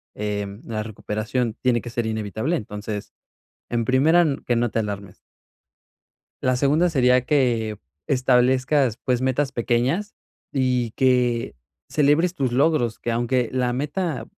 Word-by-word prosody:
em, 105 Hz, -1 st, -4 dB
la 110 Hz, -2 st, -3 dB
recuperación 110 Hz, +2 st, -3 dB
tiene 120 Hz, -2 st, +2 dB
que 120 Hz, -, -7 dB
ser 120 Hz, -1 st, -2 dB
inevitable. 110 Hz, -, -2 dB
Entonces, 105 Hz, -2 st, -6 dB, 0.6 s
en 120 Hz, -1 st, 0 dB
primera, 150 Hz, +8 st, +4 dB, 0.2 s
que 120 Hz, -, +1 dB
no 120 Hz, 0 st, +1 dB
te 115 Hz, -, 0 dB
alarmes. 100 Hz, -3 st, -5 dB, 1.3 s
La 130 Hz, 0 st, +2 dB
segunda 150 Hz, +7 st, +2 dB
sería 125 Hz, -4 st, +3 dB
que 120 Hz, -6 st, +1 dB, 0.3 s
establezcas, 130 Hz, 0 st, +2 dB
pues, 125 Hz, -2 st, +1 dB
metas 130 Hz, +1 st, 0 dB
pequeñas 130 Hz, -, 0 dB, 0.4 s
y 125 Hz, -3 st, +1 dB
que 125 Hz, -, +1 dB, 0.3 s
celebres 155 Hz, +4 st, +2 dB
tus 135 Hz, -7 st, -1 dB
logros, 130 Hz, -4 st, +2 dB
que 120 Hz, -, -3 dB
aunque 120 Hz, +1 st, 0 dB
la 125 Hz, -1 st, 0 dB
meta 145 Hz, -1 st, -2 dB
125 Hz, 130 wpm, -23 LUFS, 115-135 Hz, 1.3 s, primera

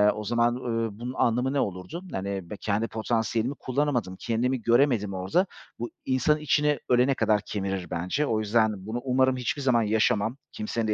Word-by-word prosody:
o 105 Hz, -, -5 dB
zaman, 120 Hz, +2 st, +2 dB
ııı, 115 Hz, -2 st, -1 dB
bunun 125 Hz, +2 st, -4 dB
anlamı 125 Hz, +2 st, +1 dB
ne 140 Hz, -, +1 dB
olurdu? 100 Hz, -, -3 dB
Hani, 95 Hz, -2 st, -4 dB
b 105 Hz, -, -6 dB
kendi 105 Hz, +3 st, -1 dB
potansiyelimi 115 Hz, +3 st, -1 dB
kullanamadım, 130 Hz, -8 st, -1 dB
kendimi 120 Hz, +2 st, 0 dB
göremedim 115 Hz, -3 st, +3 dB
orada. 95 Hz, -, +1 dB, 0.3 s
Bu 120 Hz, 0 st, -3 dB, 0.2 s
insanın 130 Hz, +4 st, +2 dB
içini 150 Hz, 0 st, +2 dB
ölene 125 Hz, +2 st, +4 dB
kadar 105 Hz, -5 st, +2 dB
kemirir 95 Hz, -3 st, -3 dB
bence. 90 Hz, -, -1 dB
O 110 Hz, -6 st, 0 dB
yüzden 110 Hz, -2 st, +1 dB
bunu 120 Hz, +2 st, -2 dB
umarım 130 Hz, 0 st, +2 dB
hiçbir 125 Hz, +3 st, -2 dB
zaman 125 Hz, -4 st, +3 dB
yaşamam, 110 Hz, +2 st, +1 dB
kimsenin 110 Hz, +1 st, -2 dB
de 105 Hz, -, +2 dB
115 Hz, 170 wpm, -27 LUFS, 105-130 Hz, 0.3 s, ölene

